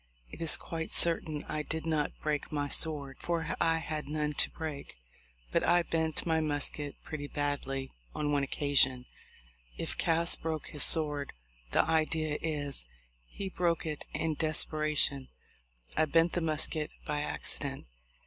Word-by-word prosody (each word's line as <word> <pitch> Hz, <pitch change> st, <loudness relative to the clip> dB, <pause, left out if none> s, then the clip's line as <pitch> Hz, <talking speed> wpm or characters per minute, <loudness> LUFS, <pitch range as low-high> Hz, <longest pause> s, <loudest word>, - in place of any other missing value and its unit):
It -, -, -9 dB
is 165 Hz, -, +2 dB
quite 160 Hz, -1 st, -5 dB
certain 160 Hz, -3 st, +2 dB
I 155 Hz, -, -2 dB
did 160 Hz, +1 st, -4 dB
not 155 Hz, -2 st, +1 dB
break 150 Hz, -1 st, -1 dB
my 145 Hz, -1 st, -1 dB
sword, 145 Hz, -3 st, 0 dB
for 170 Hz, -1 st, -1 dB
I 165 Hz, 0 st, +3 dB
had 155 Hz, -2 st, -4 dB
none 150 Hz, 0 st, -1 dB
to -, -, +5 dB
break, 155 Hz, -, -6 dB, 0.6 s
but -, -, +2 dB
I 175 Hz, 0 st, +4 dB
bent 160 Hz, -2 st, 0 dB
my 160 Hz, -1 st, +2 dB
musket 145 Hz, -1 st, +1 dB
pretty 145 Hz, -2 st, -5 dB
badly 140 Hz, -2 st, -2 dB, 0.2 s
on 150 Hz, -1 st, 0 dB
one 145 Hz, -1 st, +2 dB
occasion. 135 Hz, -2 st, +2 dB, 0.7 s
If -, -, -2 dB
Cass 170 Hz, +1 st, +3 dB
broke 160 Hz, -2 st, -4 dB
his 150 Hz, -, 0 dB
sword, 150 Hz, -2 st, +5 dB, 0.4 s
the -, -, +4 dB
idea 155 Hz, -1 st, 0 dB
is, 145 Hz, -, -1 dB, 0.4 s
he 195 Hz, -, -6 dB
broke 170 Hz, -3 st, 0 dB
it 150 Hz, -2 st, -4 dB
in 160 Hz, -1 st, -1 dB
desparation; 155 Hz, -3 st, +1 dB, 0.7 s
I 155 Hz, -, +4 dB
bent 165 Hz, +2 st, +3 dB
the 175 Hz, -, 0 dB
musket 155 Hz, -1 st, -1 dB, 0.2 s
by 150 Hz, 0 st, -1 dB
accident. -, -, -3 dB
155 Hz, 150 wpm, -31 LUFS, 145-160 Hz, 0.7 s, to